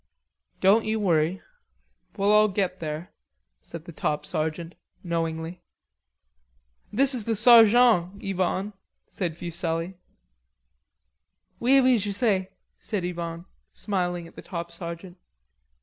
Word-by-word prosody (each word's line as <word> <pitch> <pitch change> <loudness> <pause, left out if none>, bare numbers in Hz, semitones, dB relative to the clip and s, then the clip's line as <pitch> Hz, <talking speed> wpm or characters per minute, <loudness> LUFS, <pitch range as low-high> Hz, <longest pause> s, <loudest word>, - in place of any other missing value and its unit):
"Don't 210 +4 +5
you 220 0 -1
worry. 175 -2 +1 0.7
We'll 200 +1 +2
all 210 0 +6
get 190 -2 -2
there," 155 +2 -5 0.5
said 170 -1 -10
the 170 - -9
top 150 -1 -2
sergeant 160 +2 -3 0.3
knowingly. 165 0 -3 1.3
"This 270 +5 +2
is 235 -5 -3
the 225 - 0
sarjon, 225 -4 +6
Yvonne," 195 +1 -2 0.3
said 170 -4 -4
Fuselli. 170 0 -3 1.7
"Oui, 265 +3 +5
oui, 255 -2 +4
je 205 0 -3
sais," 200 -3 +1 0.3
said 200 -5 -3
Yvonne, 170 -1 -5 0.3
smiling 180 -4 -2
at - - -18
the - - -9
top 170 -2 -6
sergeant. 170 +1 -7
180 Hz, 115 wpm, -26 LUFS, 170-210 Hz, 1.7 s, all